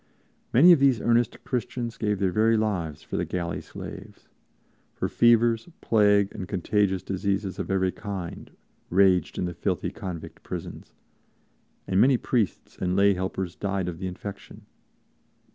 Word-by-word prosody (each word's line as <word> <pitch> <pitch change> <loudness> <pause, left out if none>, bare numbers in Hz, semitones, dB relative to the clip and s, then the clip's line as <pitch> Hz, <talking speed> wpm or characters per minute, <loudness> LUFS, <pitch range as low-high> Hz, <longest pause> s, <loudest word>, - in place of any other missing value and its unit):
Many 150 +9 +7
of 170 - +6
these 135 -4 +4
earnest 120 0 +1
Christians 120 -1 -3
gave 105 -2 0
their 95 -1 +1
very 110 +3 +3
lives 85 -9 -2
for - - -5
the - - 0
galley 85 -2 -3
slaves; - - -10 0.7
for - - -1
fevers, 120 +2 +3
plague 105 -2 +3
and 95 -4 -6
contagious 95 0 0
diseases 100 0 -2
of - - -4
every 95 -1 +1
kind 95 -5 -6 0.4
raged 95 -2 +3
in - - -1
the 90 - -4
filthy 90 +2 -2
convict 90 -4 -7
prisons, - - -8 0.9
and 95 +1 +2
many 130 0 +5
priests 115 -5 -2
and 90 0 0
lay 100 +1 +5
helpers 95 -1 -3
died 100 -3 -2
of 85 -2 -5
the 95 - -3
infection. 100 +2 -9
100 Hz, 145 wpm, -26 LUFS, 95-115 Hz, 0.9 s, Many